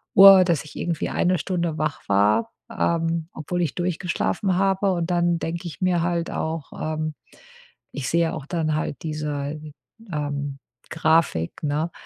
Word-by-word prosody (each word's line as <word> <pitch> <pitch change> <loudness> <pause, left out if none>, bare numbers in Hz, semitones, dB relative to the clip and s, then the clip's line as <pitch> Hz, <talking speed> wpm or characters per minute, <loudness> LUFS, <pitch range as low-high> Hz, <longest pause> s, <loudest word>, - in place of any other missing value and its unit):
Uhr, 195 -1 +10
dass 170 -5 +1
ich - - -13
irgendwie 170 -3 -2
1 180 0 +1
Stunde 170 -2 -2
wach 155 -2 -2
war, 105 - +3 0.2
ähm, 165 -5 0
obwohl 175 +3 -3
ich 165 -5 -1
durchgeschlafen 180 +2 -1
habe, 195 0 +2
und 170 0 -2
dann 175 -1 +2
denke 170 +2 -4
ich 170 - -9
mir 180 -2 +2
halt 170 0 -1
auch 160 -2 -3
ähm, 155 0 -2 0.8
ich 140 -3 -3
sehe 170 -1 +2
auch 140 - -6
dann 155 -3 0
halt 155 -1 -3
diese, 150 -1 -3 0.5
ähm, 145 -2 -3 0.3
Grafik, 160 - +1
ne? 150 +3 -1
165 Hz, 150 wpm, -24 LUFS, 150-175 Hz, 0.8 s, Uhr